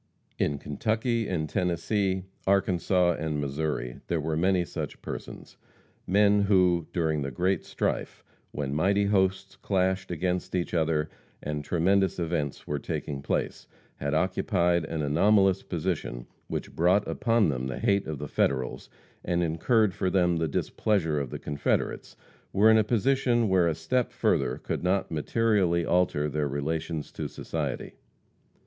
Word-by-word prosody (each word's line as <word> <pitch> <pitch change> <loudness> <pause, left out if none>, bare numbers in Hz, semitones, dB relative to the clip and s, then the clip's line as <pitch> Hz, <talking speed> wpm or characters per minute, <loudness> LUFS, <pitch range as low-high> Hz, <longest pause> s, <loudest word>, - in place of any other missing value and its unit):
In 70 - +1
Kentucky 110 - -1
and 80 -4 -1
Tennessee, 95 +2 0 0.2
Arkansas 90 -2 +2
and 75 -2 -2
Missouri, 70 -3 -3
there 85 - 0
were 80 +1 -2
many 90 +2 +2
such - - -6
persons - - -8 0.5
men 100 +2 +4
who, 90 -5 +3
during 80 -3 0
the 70 - -2
great 90 +9 0
strife, - - -3 0.3
when 70 -2 -3
mighty 100 +6 +2
hosts 95 -1 +1
clashed 95 0 0
against 90 +2 -2
each 90 -1 -2
other, 80 -2 +1 0.4
and 75 0 -3
tremendous 95 +4 +2
events 80 -5 -2
were 75 -1 -2
taking 70 0 -4
place, - - -2 0.3
had 70 +1 -2
occupied 85 -1 +1
an 80 -1 -3
anomalous 95 +5 +3
position 80 -8 -3 0.2
which - - -5
brought 90 +5 +3
upon 115 -5 +2
them 65 -2 -2
the 65 - -4
hate 100 -1 +1
of 80 -2 -3
the 75 +2 -5
Federals, 65 -3 -1 0.3
and 85 0 0
incurred 95 +6 +2
for 95 -2 -1
them 90 -2 +2
the 80 0 0
displeasure 80 0 0
of 70 -3 -3
the - - -5
Confederates, 75 -1 -2 0.4
were 105 +3 +5
in 110 - +6
a - - +4
position 120 +1 +2
where 90 -2 +4
a 80 - 0
step 100 +11 0
further - - +1
could - - -4
not 95 +2 0
materially 90 0 +1
alter 85 -5 +2
their 75 0 -1
relations 80 +2 -3
to - - -4
society. - - -4
85 Hz, 145 wpm, -27 LUFS, 75-95 Hz, 0.5 s, in